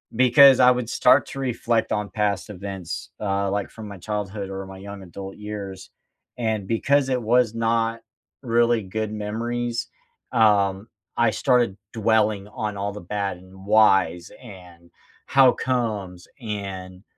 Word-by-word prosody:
because 130 +2 +7
I 125 0 +7
would 125 -2 -2
start 130 +2 +4
to 135 - -7
reflect 120 -3 -1
on 105 -1 -1
past 105 -1 -1
events, 95 -3 -6
uh, 100 -1 -1
like, 100 -1 -2
from 110 -2 -10
my 100 -1 -9
childhood 100 0 -4
or 95 0 -6
my 95 0 -10
young 100 0 -9
adult 95 +2 -9
years. 100 -3 -7 0.5
And 110 -4 -2
because 135 +4 +2
it 125 -1 0
was 115 0 +2
not 115 0 0 0.4
really 120 -2 +2
good 110 +3 -4
memories, 115 +3 -3 0.4
um, 100 -2 +3 0.3
I 120 -2 +3
started 120 -7 +1 0.2
dwelling 110 -2 +1
on 105 -1 -4
all 100 +1 -2
the 105 - -8
bad 100 0 -3
and 95 +1 -15
whys 95 -5 +3
and 90 -6 -14 0.4
how 135 -2 +5
comes 105 -8 -3
and 95 -3 -6
105 Hz, 145 wpm, -23 LUFS, 95-115 Hz, 0.5 s, because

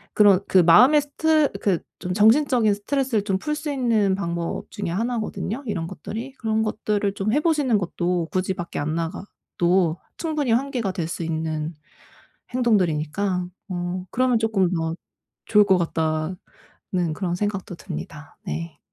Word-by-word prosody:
그런 205 -3 +6
그 190 - +5
마음의 245 - +7
스트 305 +1 +2
그 190 -5 +1 0.2
좀 180 - -3
정신적인 220 +1 +4
스트레스를 240 0 -1
좀 190 -2 0
풀 300 +8 -2
수 300 0 -5
있는 225 -7 +2
방법 170 -3 -3
중에 205 -3 -4
1 230 +7 -1
거든요 220 +4 -4
이런 185 -6 -2
것들이. 225 - -6
그런 220 -3 0
것들을 210 -2 -1
좀 210 +3 -1
해 295 - +3
보시는 295 -8 +2
것도 175 -2 -1
굳이 185 0 0
밖에 175 -1 -5
안 155 +2 -1
나가도 175 0 -1 0.2
충분히 305 -6 -1
환기가 245 -4 0
될 170 -4 -2
수 170 - -4
있는 160 0 -2 0.8
행동들이니까 185 -5 +1 0.2
어 180 0 -3
그러면 255 -2 +2
쪼끔 215 -5 +2
더 165 -1 -1 0.5
좋을 210 -1 +5
것 190 -2 +4
같다는 165 +1 -3
그런 175 +1 -2
생각도 195 -2 -3
듭니다. 75 - -8
네. 80 +2 -5
195 Hz, 300 characters per minute, -23 LUFS, 170-230 Hz, 0.8 s, 마음의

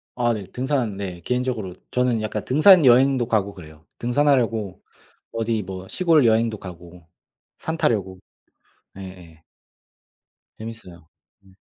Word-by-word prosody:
아 120 -1 +1
네. 100 -3 -5
등산 125 -6 -2
네. 90 -3 -6
개인적으로 125 -7 -2 0.2
저는 125 -3 +1
약간 105 -1 -3
등산 155 +4 +6
여행도 130 0 +4
가고 100 -3 0
그래요, 80 -3 -14
등산하려고 120 -6 +1 0.5
어디 115 -1 -2
뭐 95 0 -8
시골 165 -7 +3
여행도 110 -1 +2
가고 85 -2 -12 0.5
산 160 +1 -4
타려고. 95 - -1 0.8
네예. 90 -4 -12 1.2
재밌어요. 100 -8 -10 0.4
예. 95 - -20
110 Hz, 260 characters per minute, -22 LUFS, 95-125 Hz, 1.2 s, 등산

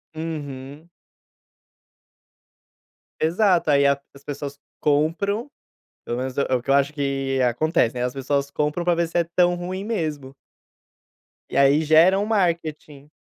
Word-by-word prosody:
Uhum. 150 -1 -7 2.3
Exato, 175 0 +2
aí 140 -1 +4
a 140 0 +3 0.2
as 140 - -16
pessoas 145 0 -6 0.2
compram, 170 - 0 0.6
pelo 120 - -3
menos 130 0 -4
é - - +4
o 125 - 0
que 135 - -4
eu - - +5
acho, 140 +1 +2
que 135 -2 -1
acontece, 125 0 +1
né, 125 - -3
as 125 - -2
pessoas 140 +1 -1
compram, 150 +4 -1
pra 175 -1 +3
ver 170 0 0
se 175 - -1
é 170 - +2
tão 175 0 +4
ruim 185 +3 -5
mesmo. 155 -11 -3 1.2
E - - -3
aí, 140 +3 +5
geram 170 +6 +5
o - - -4
marketing. 160 -7 -2
150 Hz, 145 wpm, -23 LUFS, 140-170 Hz, 2.3 s, eu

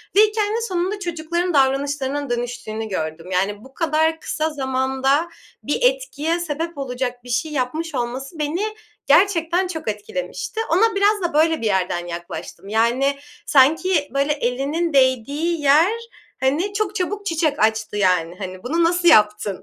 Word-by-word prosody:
ve 410 - +8
hikâyenin 430 +1 +1
sonunda 370 +2 -2
çocukların 345 0 -2
davranışlarının 280 0 +1
dönüştüğünü 240 -2 -3
gördüm. 165 -1 -4
Yani, 200 +3 -1
bu 265 - -15
kadar 320 +1 +1
kısa 315 0 -2
zamanda 265 +2 0 0.3
bir - - -1
etkiye - - +1
sebep 330 0 -4
olacak 250 -2 -4
bir 245 - -12
şey 280 +6 -1
yapmış 300 +4 -2
olması 260 +6 -4
beni 305 +5 -1 0.5
gerçekten 360 -1 +3
çok 325 -7 -6
etkilemişti. 440 - -4
Ona 435 +6 +3
biraz 405 +1 +3
da 345 -1 -1
böyle 320 0 +3
bir - - -3
yerden 185 -4 0
yaklaştım. 175 +3 -7
Yani, 240 +6 +2 0.3
sanki, 305 +3 +3
böyle, 280 +2 +1
elinin 290 +5 -1
değdiği 280 +5 +1
yer, 300 +7 +5 0.5
hani, 305 +10 0
çok 415 -1 -1
çabuk 405 +2 -2
çiçek 320 -5 0
açtı, 220 -1 +1
yani. 180 -3 +2
Hani, 185 -1 -7
bunu 330 +7 +1
nasıl 350 +1 +2
yaptın 210 - +3
290 Hz, 145 wpm, -21 LUFS, 245-340 Hz, 0.5 s, ve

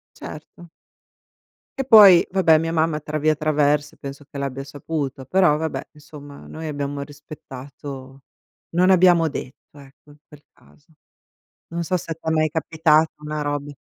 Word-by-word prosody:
Certo. 160 +3 -11 1.1
E 270 - -2
poi, 205 -8 +8
vabbè, 180 -4 +4
mia 165 +1 -2
mamma 160 -1 0
tra 155 0 -5
via 155 +1 +2
traverse, 150 -1 0
penso 140 0 -9
che - - -9
l'abbia 135 -1 -4
saputo, 145 -1 -5
però 180 0 +3
vabbè, 160 +1 -4
insomma 145 -1 -13
noi 160 0 -8
abbiamo 145 -1 -4
rispettato 140 -2 -11 0.5
non 180 +2 +2
abbiamo 175 -3 +5
detto, 140 +1 -10
ecco, 140 +2 -18
in 145 - -19
quel 150 -1 -17
caso. 160 +2 -25 0.8
Non 170 0 -4
so 180 +2 -1
se 170 -2 -5
t'è 160 0 -5
mai 155 -1 +2
capitato, 160 0 +2
una 150 0 -5
robe 145 0 -4
150 Hz, 145 wpm, -22 LUFS, 145-165 Hz, 1.1 s, poi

